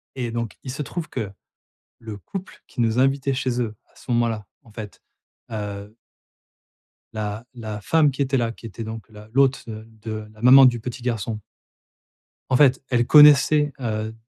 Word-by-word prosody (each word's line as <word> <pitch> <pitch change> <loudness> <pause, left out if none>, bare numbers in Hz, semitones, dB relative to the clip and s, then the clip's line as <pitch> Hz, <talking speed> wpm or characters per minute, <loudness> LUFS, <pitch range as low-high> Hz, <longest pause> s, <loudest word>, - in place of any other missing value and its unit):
Et 120 -3 -3
donc, 115 -1 -4
il 130 - -6
se 150 - -4
trouve 170 +3 -5
que, 110 -6 -4 0.7
le 110 -2 -7
couple 190 - -9
qui - - -6
nous 115 +1 +2
invitait 135 0 +1
chez 125 -2 -1
eux 110 -2 -2 0.2
à - - -31
ce - - -11
moment-là, 115 -4 0 0.2
en 115 - -19
fait, 105 -1 -9 0.5
heu 105 0 -6 1.2
la 105 +1 -4
la 110 -3 -6
femme 155 +1 +3
qui 135 +1 -2
était 135 0 0
là, 115 -1 -1
qui 115 - -19
était 115 +1 -7
donc 110 -1 -8
la 105 0 -13
l'hôte, 135 0 +2
heu, 110 0 -8 0.2
de 110 -1 -5
la 105 - -17
maman 130 +2 +9
du 120 -2 +4
petit 120 +1 -7
garçon 110 -3 -3 1.1
en 130 - +3
fait 135 -1 +4
elle 120 -1 +2
connaissait, 150 0 +7
heu, 110 -2 -3
120 Hz, 175 wpm, -23 LUFS, 110-135 Hz, 1.2 s, maman